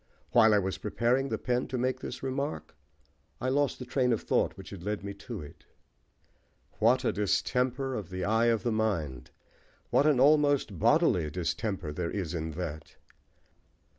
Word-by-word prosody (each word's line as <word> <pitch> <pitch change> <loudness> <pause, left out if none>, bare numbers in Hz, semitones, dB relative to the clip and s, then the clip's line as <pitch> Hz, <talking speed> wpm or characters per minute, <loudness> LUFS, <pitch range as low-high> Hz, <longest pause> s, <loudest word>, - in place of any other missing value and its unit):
While 110 -2 +6
I - - +5
was 95 -1 -1
preparing 120 +5 0
the - - -1
pen 125 0 -1
to 130 - -3
make 130 +1 0
this - - -7
remark, 140 - -3 0.7
I 130 - -1
lost 140 +1 +1
the 125 - -7
train 125 0 +1
of 115 - +1
thought - - +1
which - - -10
had 95 - -8
led 105 +2 -3
me 100 0 -5
to 100 -1 -7
it." 75 - -14 1.1
What 125 +4 +3
a - - +3
distemper 125 +6 0
of 105 -8 -5
the 95 0 -4
eye 110 +2 +3
of 115 -2 +2
the 120 - 0
mind! 85 - -1 0.6
What 145 - +4
an 145 -5 +4
almost 145 - +3
bodily 115 - +3
distemper 90 0 -3
there 85 +1 -2
is 90 -5 -3
in 80 -1 -3
that! 80 -2 -6
110 Hz, 170 wpm, -29 LUFS, 95-130 Hz, 1.1 s, While